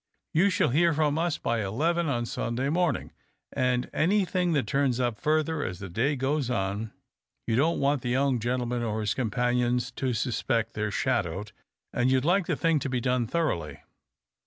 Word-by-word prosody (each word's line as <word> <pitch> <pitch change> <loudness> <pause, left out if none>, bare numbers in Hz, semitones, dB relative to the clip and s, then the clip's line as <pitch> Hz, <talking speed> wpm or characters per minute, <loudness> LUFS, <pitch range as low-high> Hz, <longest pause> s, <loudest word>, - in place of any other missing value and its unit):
You 180 +6 +4
shall 160 -5 +2
hear 165 +5 +3
from 150 0 +1
us 170 -2 0
by 115 -2 -1
eleven 160 - 0
on 120 -3 0
Sunday 120 +3 -2
morniug, 170 -3 0 0.4
and 125 -1 +1
anything 185 0 +1
tliat 140 -7 +1
turns 130 +2 +1
up 120 -4 -1
further 155 0 +1
as 90 - -4
the 95 0 -7
day 125 - 0
goes 135 0 -1
on. 100 -1 -2 0.5
You 110 - 0
don't 155 +7 +2
want 140 -1 +1
the 120 - -3
young 130 0 +2
gentleman 120 +1 -1
or 110 -2 -2
his 105 -2 0
com 120 0 -1
panions 125 +1 0
to 130 -2 0
suspect 115 -1 -1
that - - -7
they're 105 0 0
shadowed, 105 -4 -1 0.4
and 120 +1 +2
you'd 130 +1 +2
like 180 +2 +2
the - - +1
thing 165 -2 +2
to 140 - -3
be 130 -1 0
done 125 -1 0
thoroughly 100 - -2
125 Hz, 185 wpm, -27 LUFS, 115-155 Hz, 0.5 s, You